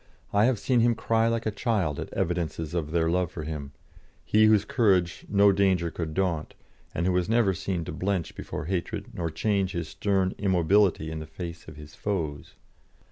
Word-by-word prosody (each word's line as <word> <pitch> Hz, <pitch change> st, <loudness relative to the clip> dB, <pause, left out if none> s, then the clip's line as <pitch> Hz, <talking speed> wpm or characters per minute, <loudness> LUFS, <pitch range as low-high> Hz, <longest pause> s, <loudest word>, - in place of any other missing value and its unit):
I 100 Hz, +2 st, +5 dB
have 125 Hz, -1 st, +2 dB
seen 125 Hz, +4 st, +1 dB
him 120 Hz, 0 st, +3 dB
cry 115 Hz, 0 st, +1 dB
like 115 Hz, 0 st, -1 dB
a 110 Hz, -, 0 dB
child 100 Hz, -, -1 dB
at -, -, -6 dB
evidences 80 Hz, -2 st, -2 dB
of 80 Hz, -4 st, -2 dB
their 80 Hz, 0 st, +1 dB
love 90 Hz, 0 st, +1 dB
for 80 Hz, -, -6 dB
him, 75 Hz, -2 st, -5 dB, 0.5 s
he 110 Hz, 0 st, +4 dB
whose 105 Hz, -2 st, +4 dB
courage 95 Hz, -8 st, +1 dB
no 100 Hz, 0 st, +5 dB
danger 95 Hz, -4 st, +2 dB
could 80 Hz, -2 st, -5 dB
daunt, 90 Hz, -5 st, -1 dB, 0.4 s
and 85 Hz, -, 0 dB
who 95 Hz, -, +3 dB
was 90 Hz, 0 st, 0 dB
never 115 Hz, -4 st, +3 dB
seen 90 Hz, -2 st, -3 dB
to -, -, -5 dB
blench 90 Hz, +1 st, -2 dB
before -, -, -6 dB
hatred 90 Hz, 0 st, -3 dB
nor 85 Hz, -2 st, -2 dB
change 95 Hz, +4 st, 0 dB
his 85 Hz, -3 st, -3 dB
stern 95 Hz, -1 st, 0 dB
immobility 95 Hz, -3 st, +2 dB
in 80 Hz, -, -4 dB
the 80 Hz, -, -7 dB
face 85 Hz, +1 st, -8 dB
of 80 Hz, -, -10 dB
his 75 Hz, 0 st, -12 dB
foes. 80 Hz, -9 st, -4 dB
90 Hz, 190 wpm, -27 LUFS, 80-100 Hz, 0.5 s, I